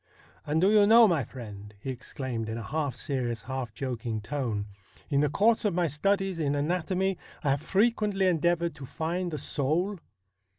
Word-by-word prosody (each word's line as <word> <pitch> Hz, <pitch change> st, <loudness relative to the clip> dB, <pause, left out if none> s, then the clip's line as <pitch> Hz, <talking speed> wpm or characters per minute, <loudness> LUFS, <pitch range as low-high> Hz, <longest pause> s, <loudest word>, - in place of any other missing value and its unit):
' -, -, -29 dB
And 150 Hz, +2 st, +1 dB
do 190 Hz, +4 st, +4 dB
you 210 Hz, -1 st, +6 dB
know, 230 Hz, +1 st, +8 dB
my 165 Hz, -8 st, +2 dB
friend,' 105 Hz, -4 st, -10 dB
he 135 Hz, -, -4 dB
exclaimed 125 Hz, -3 st, -5 dB
in 110 Hz, -, -3 dB
a 115 Hz, -, -5 dB
half 145 Hz, +3 st, -2 dB
serious, 120 Hz, -5 st, -2 dB
half 130 Hz, -3 st, -4 dB
joking 120 Hz, -3 st, -3 dB
tone, 110 Hz, -3 st, -2 dB, 0.2 s
' -, -, -27 dB
in 140 Hz, -, +3 dB
the 150 Hz, 0 st, +3 dB
course 220 Hz, -, +3 dB
of 205 Hz, -5 st, +1 dB
my 175 Hz, -1 st, +2 dB
studies 195 Hz, +4 st, 0 dB
in 145 Hz, -2 st, +1 dB
anatomy 180 Hz, +5 st, 0 dB, 0.2 s
I 140 Hz, -, +2 dB
have 140 Hz, +1 st, 0 dB
frequently 205 Hz, 0 st, +2 dB
endeavoured 170 Hz, -1 st, +2 dB
to 140 Hz, -, -7 dB
find 175 Hz, +5 st, -2 dB
the 155 Hz, -, -4 dB
soul? 165 Hz, +9 st, 0 dB
150 Hz, 185 wpm, -28 LUFS, 130-185 Hz, 0.2 s, know